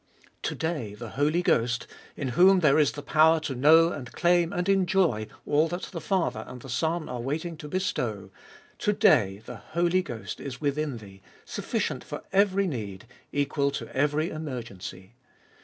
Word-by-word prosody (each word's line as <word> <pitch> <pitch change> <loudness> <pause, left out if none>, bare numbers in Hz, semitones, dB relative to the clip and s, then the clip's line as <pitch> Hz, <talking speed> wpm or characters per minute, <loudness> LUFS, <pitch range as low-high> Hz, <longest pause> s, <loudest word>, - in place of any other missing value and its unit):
To - - -2
day 150 -11 -3
the 115 +1 -8
Holy 150 +7 +1
Ghost, 120 -5 +1 0.3
in 135 - -2
whom 185 +7 +5
there 150 -1 +5
is 150 - +3
the 145 - -7
power 160 +1 +5
to 145 - -3
know 160 +6 +6
and 125 -6 -7
claim 175 -1 +3
and 180 +1 -2
enjoy 180 - +2 0.2
all 150 +2 +3
that 175 +3 -5
the 170 -4 -5
Father 145 - 0
and 125 - -9
the 135 - -10
Son 160 +6 -1
are 125 - -5
waiting 160 +6 -3
to 150 - -8
bestow, 115 - -2 0.5
to 210 - +1
day 115 - +3
the 125 - -8
Holy 175 - 0
Ghost 120 -10 -7
is 130 -3 -6
within 145 -2 -1
thee, 100 -3 -13 0.2
sufficient - - -2
for - - -7
every 200 0 +3
need, 110 - -5 0.3
equal 140 0 +1
to 140 - -6
every 150 +4 +1
emergency. 115 - -7
150 Hz, 170 wpm, -27 LUFS, 120-170 Hz, 0.5 s, know